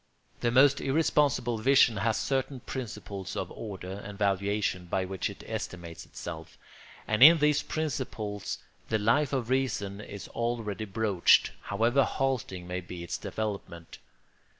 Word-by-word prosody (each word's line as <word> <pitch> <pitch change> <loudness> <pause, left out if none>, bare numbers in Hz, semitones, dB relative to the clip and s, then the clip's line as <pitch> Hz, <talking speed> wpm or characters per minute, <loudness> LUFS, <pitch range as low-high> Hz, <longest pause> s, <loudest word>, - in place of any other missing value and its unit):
The 120 - +1
most 135 +3 +5
irresponsible 140 -5 +2
vision 125 -2 +5
has 110 +2 +1
certain 135 -1 -1
principles 105 -6 -6
of 90 - -3
order 95 -2 -7
and 100 0 -8
valuation 100 -2 0
by 95 +2 0
which 95 0 -3
it - - -10
estimates 85 -2 -6
itself; 80 -2 -8 0.5
and 110 +1 0
in 160 +5 +11
these 150 -1 +3
principles 110 -9 -3 0.3
the 110 - +2
Life 120 +8 +2
of 130 -3 -2
Reason 105 -7 -1
is 100 -3 -8
already 115 -3 -2
broached, 100 -3 +3
however 115 +7 +2
halting 125 -12 -2
may 90 +1 -4
be 90 0 -8
its 85 - -4
development. 100 -6 -5
110 Hz, 135 wpm, -29 LUFS, 95-130 Hz, 0.5 s, in